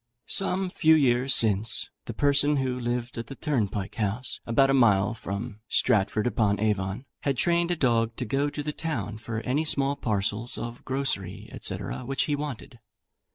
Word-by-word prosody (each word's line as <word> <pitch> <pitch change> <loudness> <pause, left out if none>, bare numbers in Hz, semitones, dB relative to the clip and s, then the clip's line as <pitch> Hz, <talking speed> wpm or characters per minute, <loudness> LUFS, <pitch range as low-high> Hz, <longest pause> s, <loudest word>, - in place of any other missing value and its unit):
Some 190 -1 +1
few 160 -2 +5
years 130 -2 +3
since, 110 -1 +3 0.2
the - - -5
person 145 +1 +3
who 130 -2 -1
lived 120 -1 -3
at 115 - -6
the 135 - -8
turnpike 105 -10 -2
house, 110 +2 -2
about 135 +4 +4
a - - +3
mile 110 -6 +4
from 105 +1 -6
Stratford 105 -2 +2
upon 105 -4 +1
Avon, 100 +2 -1
had 140 -3 -1
trained 170 +3 +2
a 175 - +1
dog 115 -6 +1
to 125 - -3
go 140 +5 0
to 145 0 -5
the 150 +1 -3
town 110 - -4
for 115 0 -4
any 135 +6 0
small 140 -2 +1
parcels 110 -1 -1
of 120 +1 -6
grocery, 130 -9 -3
&c. - - +1
which 135 +2 -2
he 150 - 0
wanted. 140 -4 -6
125 Hz, 170 wpm, -27 LUFS, 110-140 Hz, 0.2 s, few